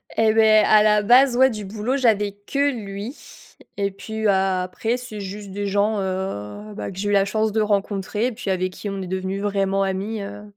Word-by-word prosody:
Et 220 -1 +3
beh, 220 -1 +6
à 215 -1 +6
la 210 -1 +4
base, 245 +4 +5
ouais, 260 +1 +5
du 215 -3 -6
boulot 215 +7 -2
j'avais 215 -6 +2
que 275 +8 -1
lui 210 +2 -6 0.6
et 200 -1 0
puis, 220 +3 -6
bah, 190 -2 +2
après 220 +6 -2
c'est 245 -4 -8
juste 200 +1 -7
des 205 +1 -4
gens, 205 +1 +1
heu, 190 - -4
bah, - - -5
que 185 - -12
j'ai 205 - -1
eu - - +1
la 195 -1 +4
chance 215 +2 0
de 220 - 0
rencontrer, 205 +2 -1
puis 215 -3 -6
avec 185 0 -1
qui 205 - -8
on 195 -1 -4
est 185 - -5
devenu 190 +1 -3
vraiment 195 -1 0
amis, 195 +3 -3
heu, 205 +1 -8
205 Hz, 210 wpm, -22 LUFS, 195-220 Hz, 0.6 s, beh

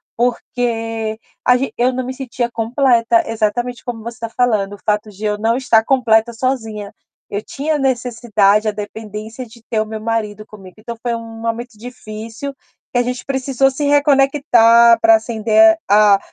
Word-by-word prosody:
porque 225 -2 -2 0.3
a 250 0 +4
ge 255 -3 -3
eu 245 +2 +2
não 255 0 -3
me 260 - -4
sentia 250 -2 -3
completa. 240 +6 +2
Exatamente 230 +1 -2
como 230 -3 -6
você 235 +1 -8
tá 230 -1 -4
falando: 215 -5 0
o 205 - -11
fato 210 0 0
de 210 +1 -8
eu 210 0 -1
não 230 +3 +1
estar 230 -4 +3
completa 235 -2 +2
sozinha. 225 -4 -3 0.4
Eu 205 - -1
tinha 295 +7 -2
necessidade, 235 -5 +1
a - - +2
dependência, 215 +3 -7
de 230 +1 -17
ter 220 - 0
o 215 - 0
meu 215 0 -7
marido 215 -2 -3
comigo. 195 -4 -14
Então 235 +1 -7
foi 240 -1 -1
um 225 -1 -9
momento 230 0 -4
difícil, 225 +2 -8 0.4
que - - +1
a - - +4
gente 250 0 -4
precisou 270 0 0
se 285 +2 -3
reconectar 275 -5 +5
pra 335 0 +6
acender 235 +5 +3
a 205 -1 +5
230 Hz, 170 wpm, -18 LUFS, 220-250 Hz, 0.4 s, pra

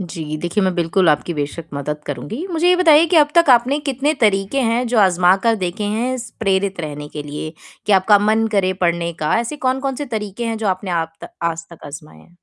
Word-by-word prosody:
जी, 160 -4 -5
देखिए, 175 +5 -1
मैं 185 -1 0
बिल्कुल 175 +1 +1
आपकी 155 +3 +1
बेशक 150 +3 -4
मदद 150 +2 -4
करूँगी। 145 - -5
मुझे 335 +2 +2
ये 360 - +5
बताइए 325 -3 +6
कि 345 - +1
अब 295 -2 +5
तक 335 -4 +5
आपने 250 +4 +4
कितने 275 +3 0
तरीके 205 +3 +1
हैं, 240 0 0
जो 235 -1 0
आज़मा 185 -2 +4
कर 230 - +4
देखे 190 +3 -3
हैं, 230 +5 -1
स 235 -1 -8
प्रेरित 195 -2 0
रहने 150 -2 -6
के 150 0 -7
लिए, 150 +2 -6 0.3
कि 210 - +2
आपका 200 +2 +5
मन 220 +2 +2
करे 190 -2 +2
पढ़ने 170 -1 0
का? 155 -1 -1
ऐसे 265 +6 -5
कौन-कौन 265 0 -1
से 290 - -4
तरीके 215 -1 -5
हैं, 225 -1 -2
जो 220 - -3
आपने 185 0 -2
आप 165 -1 -2
त - - -9
आज 165 0 -2
तक 170 - -14
आज़माए 145 +1 -11
हैं? 175 - -21
195 Hz, 225 wpm, -19 LUFS, 170-240 Hz, 0.3 s, बताइए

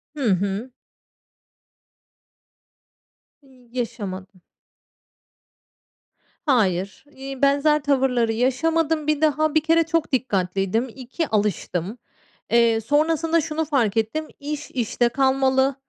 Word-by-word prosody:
Hı 285 - -4
hı. 200 +5 -1 2.7
Y 255 -3 -22
yaşamadım. 200 -6 -5 2.0
Hayır, 200 - +1
eee, 270 -1 -8
benzer 285 +1 +3
tavırları 260 -5 +1
yaşamadım. 305 +6 0
Bir 305 -1 +1
daha, 310 0 +2
bir 315 - +5
kere 330 +1 +3
çok 325 -1 -1
dikkatliydim. 195 -1 0
2, 270 +5 -4
alıştım. 205 -1 -2 0.5
Eee, 230 -1 +4
sonrasında 320 +5 +1
şunu 315 +1 -2
fark 235 -8 0
ettim, 265 +9 -1
iş 295 +1 -6
işte 240 -1 0
kalmalı. 265 +1 +2
265 Hz, 95 wpm, -23 LUFS, 225-300 Hz, 2.7 s, bir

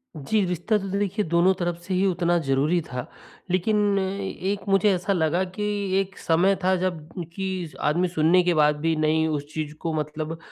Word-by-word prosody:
जी, 190 +8 0
रिश्ता 180 +5 0
तो 195 -1 -5
देखिए 200 +1 -1
दोनों 170 +3 +4
तरफ 175 -1 -1
से 185 +2 -4
ही 190 +2 +2
उतना 175 -2 +2
ज़रूरी 140 +6 +2
था, 125 -4 -6 0.5
लेकिन 205 +2 +2 0.2
एक 195 0 -3
मुझे 195 +1 +4
ऐसा 180 +2 0
लगा 170 +1 +1
कि 185 +3 -5 0.4
एक 195 0 -4
समय 180 +4 +2
था 185 +1 +3
जब 175 -4 -2 0.3
कि 185 -3 -4
आदमी 170 +5 +1
सुनने 170 +1 +3
के 175 - +2
बाद 150 -2 +4
भी 165 0 +2
नहीं 155 +1 +2
उस 150 -2 -2
चीज़ 155 -1 -4
को 165 -2 -2
मतलब 155 +1 -3
175 Hz, 185 wpm, -24 LUFS, 155-190 Hz, 0.5 s, दोनों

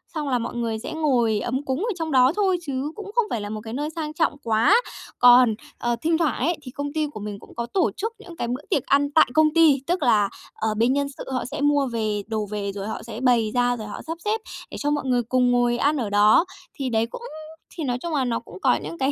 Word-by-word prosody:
xong 300 -3 -2
là 250 -2 +1
mọi 235 +1 -5
người 230 -2 -2
sẽ 255 - -6
ngồi 245 -9 +2
ấm 260 +6 -3
cúng 265 +1 -1
ở 450 +5 -1
trong 325 -3 -3
đó 255 +1 +5
thôi 385 -3 +2
chứ 280 -1 -3
cũng 410 -1 -8
không 475 -2 +3
phải 225 - -2
là 205 - -5
một 215 0 -5
cái 225 0 -7
nơi 295 +3 -2
sang 315 -1 -5
trọng 315 -2 0
quá. 230 - +4 0.4
Còn, 245 -2 +7 0.2
ờ, 240 0 0
thinh 325 0 +2
thoảng 320 -6 0
ấy 320 +6 0
thì 255 - -8
công 285 +2 -5
ty 310 -1 0
của 285 -7 -9
mình 205 -1 -6
cũng - - -16
có 235 - -2
tổ 370 +11 +1
chức 445 +3 -3
những 360 -5 -11
cái 235 - -2
bữa 250 +4 -3
tiệc 275 - +1
ăn 285 +1 +2
tại 315 - +5
công 310 -1 +4
ty, 315 -5 +5
tức 350 -2 0
là, 215 -5 +3 0.2
ờ, 220 -1 -1
bên 235 +4 +3
nhân 280 0 0
sự - - -7
họ 255 - -2
sẽ 285 +3 -5
mua 290 -2 +3
về 215 -3 -1
đồ 220 -1 -2
về 200 -1 -2
rồi 200 +1 -6
họ 220 - -5
sẽ 230 -1 -7
bày 240 -4 +3
ra, 245 0 +2
rồi 215 -2 -7
họ - - -7
sắp 325 +1 -4
xếp 430 +1 0 0.3
để - - -6
cho 290 +1 0
mọi 290 -2 -1
người 245 -2 +1
cùng 250 +1 +2
ngồi 245 0 +2
ăn 290 +4 +2
ở 235 -6 -2
đó. 210 - +5 0.3
Thì 270 -3 -3
đấy 225 -1 +1
cũng - - -7 0.5
thì 325 - -4
nói 245 -3 -1
chung 340 -1 -4
là 275 -3 +1
nó 235 -2 -1
cũng - - -13
có - - +4
những 335 - -6
cái 270 0 +1
260 Hz, 275 wpm, -24 LUFS, 230-305 Hz, 0.5 s, Còn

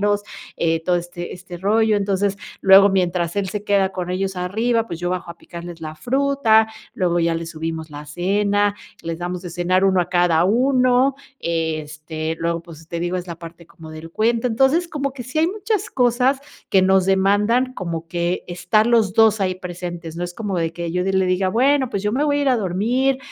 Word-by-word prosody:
empijamarlos, 205 0 +1 0.3
eh, 165 -1 +1
todo 180 0 +2
este 175 0 -6
este 180 -1 -9
rollo, 215 +4 +2
entonces 200 0 0 0.2
luego 195 +1 +7
mientras 180 -2 0
él 200 -1 0
se 205 +1 -4
queda 195 -2 +2
con 180 -1 -4
ellos 190 +1 -2
arriba, 225 +6 0
pues 170 - -6
yo 175 +1 -2
bajo 180 -1 -3
a 170 - -9
picarles 170 -1 -9
la 155 -1 -6
fruta, 250 - +2 0.3
luego 175 -2 +1
ya 165 0 +1
les 165 0 -4
subimos 160 -1 -5
la 150 +1 -9
cena, 200 +5 +1 0.3
les 165 0 -4
damos 175 +1 -4
de 175 - -7
cenar 180 +2 +1
1 190 -1 +3
a 175 - -2
cada 175 -2 +3
1, 255 +4 +3 0.2
este, 155 -1 -3
luego, 170 0 -1
pues, 165 -1 -14
te 170 - -4
digo, 175 +1 -1
es 180 0 -5
la 170 -2 -6
parte 170 0 -11
como 165 -2 -13
del 155 +1 -9
cuento, 230 +5 +1
entonces, 270 +9 +2
como 280 -4 -3
que 265 -2 -7
sí 255 +5 -4
hay 320 - +4
muchas 420 +2 -2
cosas 250 +2 +2 0.3
que 190 - +4
nos 190 0 +4
demandan 205 +7 +2
como 170 -4 -5
que 175 +1 -2
estar 180 +5 +1
los 225 -5 +3
2 220 0 +4
ahí 185 -1 +1
presentes, 175 -2 -7
no 175 - -2
es 175 0 -7
como 205 -4 -3
de 165 -1 -1
que 170 0 -4
yo 180 +1 -1
de 195 - 0
le 190 -1 +2
diga: 185 +1 +1
"Bueno, 260 +5 +2
pues 200 - -3
yo 210 - 0
me 275 +5 +1
voy 290 -1 +1
a - - 0
ir 280 - +2
a 255 - +3
dormir, 235 +7 0
185 Hz, 210 wpm, -21 LUFS, 170-225 Hz, 0.3 s, luego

